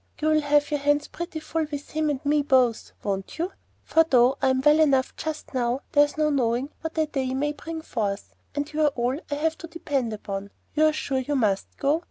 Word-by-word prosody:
You'll 310 0 +3
have 290 0 +2
your 295 - +1
hands 290 +1 +2
pretty 340 -1 -5
full 320 0 -2
with 290 -1 -6
him 310 -1 0
and 285 -1 -3
me 295 +1 +3
both, 255 -5 +2
won't 195 -1 -3
you? 345 +4 -1 0.3
for 325 - +4
though 255 -4 +4
I'm 260 -1 +3
well 295 +3 +5
enough 275 -4 +3
just 310 -2 -5
now, 250 +1 0
there's 290 0 +3
no 305 -1 +2
knowing 255 +1 0
what 320 0 -5
a 315 - +3
day 265 -3 -2
may 295 +2 0
bring 320 +1 -7
forth, 205 -7 -3 0.2
and 290 +1 -3
you're 305 0 +3
all 255 0 -1
I 290 - -1
have 320 +2 -1
to 335 - -7
depend 285 -7 -2
upon. 200 -2 -5 0.2
You're 310 0 +4
sure 275 -3 -1
you 285 +3 -2
must 205 -7 0
go? 290 +3 +2
290 Hz, 210 wpm, -25 LUFS, 255-310 Hz, 0.3 s, well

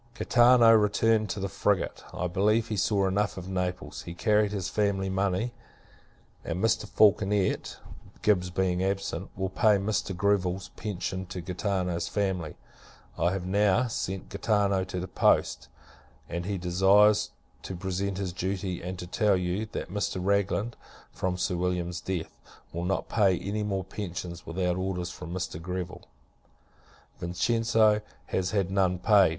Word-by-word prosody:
Gaetano 120 -1 +6
returned 110 0 +3
in 100 - -5
the - - 0
frigate. 100 0 -1
I 90 - -3
believe, 105 +5 +1
he 110 - -1
saw 100 0 +2
enough 100 +2 0
of 90 0 -6
Naples. 90 -1 -3
He 85 - -8
carried 105 +1 +2
his 100 -3 -2
family 100 -2 0
money; 95 +4 0 0.9
and 85 - -3
Mr. 110 +2 +1
Falconet 100 -2 +2 0.5
(Gibbs 90 -4 +3
being 90 0 0
absent) 95 -2 -2
will 95 0 -1
pay 105 +1 +4
Mr. 100 -2 -2
Greville's 95 -1 +1
pension 95 -2 -4
to 90 0 -6
Gaetano's 90 -1 -2
family. 95 -6 -2 0.6
I 85 +2 +1
have 95 -1 -3
now 100 +5 +3
[sent] 95 -5 -4
Gaetano 100 -2 +1
to 90 - -4
the 90 - -4
post: - - +2 0.6
and 85 +1 -4
he 100 -1 -1
desires, 100 +4 +4 0.3
to 95 - -6
present 95 +1 -2
his 95 -3 -3
duty; 95 0 -3
and 90 +1 -5
to 90 - -6
tell 105 +2 +2
you, 90 +4 -2
that - - -4
Mr. 105 -1 -2
Ragland, 100 +4 0 0.4
from 90 -1 -2
Sir 90 - -1
William's 90 -1 -1
death, 90 -4 -4 0.3
will 85 +1 -3
not 95 +2 -1
pay 100 -5 +3
any 100 +4 -3
more 100 -2 -1
pensions, 90 -3 -6
without 90 +1 -1
orders 90 -1 -2
from 85 - -8
Mr. 90 -3 -4
Greville. 90 +1 -5 1.1
Vincenzo 110 +4 +2 0.2
has 95 -1 -1
had 95 -3 0
none 95 -2 +2
paid. 100 0 +5
95 Hz, 150 wpm, -28 LUFS, 90-105 Hz, 1.1 s, Gaetano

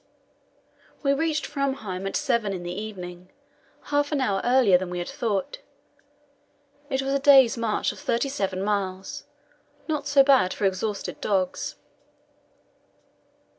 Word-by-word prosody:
We 275 -1 +3
reached 310 0 0
Framheim 245 -10 -3
at - - -4
seven 215 -4 0
in 180 -2 -5
the 175 0 -4
evening, 180 -3 -7 0.6
half 290 +1 +2
an 295 - 0
hour 200 -7 0
earlier 245 -6 +4
than 180 0 +1
we 180 - -4
had 175 - -3
thought. 240 - -2 1.3
It 265 -1 -1
was 270 0 -1
a 275 - +2
day's 270 -4 +6
march 230 -3 0
of - - -12
thirty 235 +4 0
seven 195 -8 -2
miles 195 -2 -3 0.6
not 300 -3 -2
so 280 -1 +6
bad 265 -9 +4
for 205 - -1
exhausted 195 +2 -2
dogs. 190 -3 -1
215 Hz, 135 wpm, -25 LUFS, 190-275 Hz, 1.3 s, day's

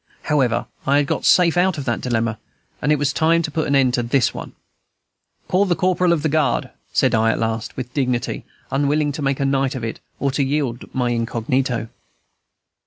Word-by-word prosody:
However, 130 -6 +1 0.2
I 140 +1 +4
had 145 - +3
got - - -2
safe 175 -2 +5
out 180 -1 +2
of 140 - -5
that 120 - -1
dilemma, 115 -3 -1 0.4
and 150 - +1
it 150 - +4
was 145 0 0
time 165 +1 +3
to 155 - -3
put 160 +1 -1
an 140 - +2
end 130 -2 +3
to 125 - +1
this 120 +1 +1
one, - - -8 0.9
"Call 190 +2 +2
the 180 -3 +1
corporal 180 -1 +2
of 160 -4 +1
the - - +2
guard," 155 -1 +1 0.2
said 130 - +2
I 110 0 +3
at - - +1
last, 115 -1 -3
with 125 -1 -6
dignity, 125 -4 -1 0.3
unwilling 145 +2 +1
to 150 - -6
make 135 -1 0
a 140 - +1
night 135 -1 +1
of 125 - -5
it 115 - -4 0.2
or 140 - 0
to 140 +1 0
yield 135 -3 -2
my 125 -2 +1
incognito. 115 0 -1
135 Hz, 205 wpm, -21 LUFS, 120-150 Hz, 0.9 s, safe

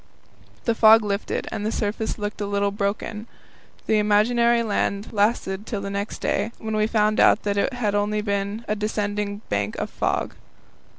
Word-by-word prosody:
The 230 - +2
fog 225 0 +7
lifted, 200 0 -2
and 205 - -4
the 215 - -1
surface 220 0 -2
looked 210 0 -4
a 205 - -1
little 200 0 0
broken. 205 +2 -3 0.6
The 215 - +3
imaginary 235 +3 +3
land 205 -1 -1
lasted 205 -1 0
till 210 - -3
the 200 0 -5
next 200 +2 -4
day, 225 - 0
when 220 -1 -4
we 215 0 +2
found 215 -1 +2
out - - +5
that 205 -1 0
it 205 +6 0
had 220 -5 -1
only 205 +1 0
been 200 +2 -2
a 210 - 0
descending 210 -1 -2
bank 100 +1 -1
of - - -4
fog. - - -1
210 Hz, 175 wpm, -23 LUFS, 200-220 Hz, 0.6 s, fog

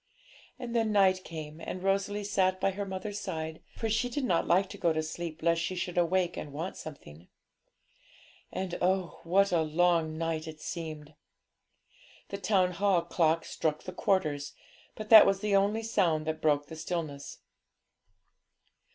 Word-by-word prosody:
"' - - -25
And 240 -2 -5
then 225 -2 +2
night 190 -2 +4
came, 155 -1 -8
and 185 - -5
Rosalie 200 +1 0
sat 185 -2 +1
by 195 - +1
her 200 +1 -4
mother's 195 +2 -5
side, 160 -5 -5
for 225 - -2
she 225 +3 0
did 280 +3 -3
not 175 -8 +1
like 185 +3 +3
to 200 - -8
go 170 - +2
to 160 0 -1
sleep 160 0 -6
lest 170 0 +2
she 185 +2 -2
should 180 -1 -3
awake 175 +1 +1
and 145 - -6
want 160 +6 -5
something. 85 - -11 1.2
And 185 -2 -4
oh, 185 -1 0
what 195 +4 +3
a 170 -2 +3
long 160 0 +1
night 165 -1 -2
it 155 -1 -8
seemed! 155 -3 -6 1.2
The 200 - -5
Town 190 -3 +2
Hall 185 -1 +2
clock 165 -1 +1
struck 155 -1 -2
the 185 - -7
quarters, 155 -8 0 0.4
but 215 0 -8
that 220 -3 +10
was 195 -1 +2
the 210 -1 +1
only 205 +3 +2
sound 175 -8 +1
that 160 0 -3
broke 145 -2 +2
the 160 - -9
stillness. 155 -4 -5
175 Hz, 170 wpm, -30 LUFS, 160-195 Hz, 1.2 s, that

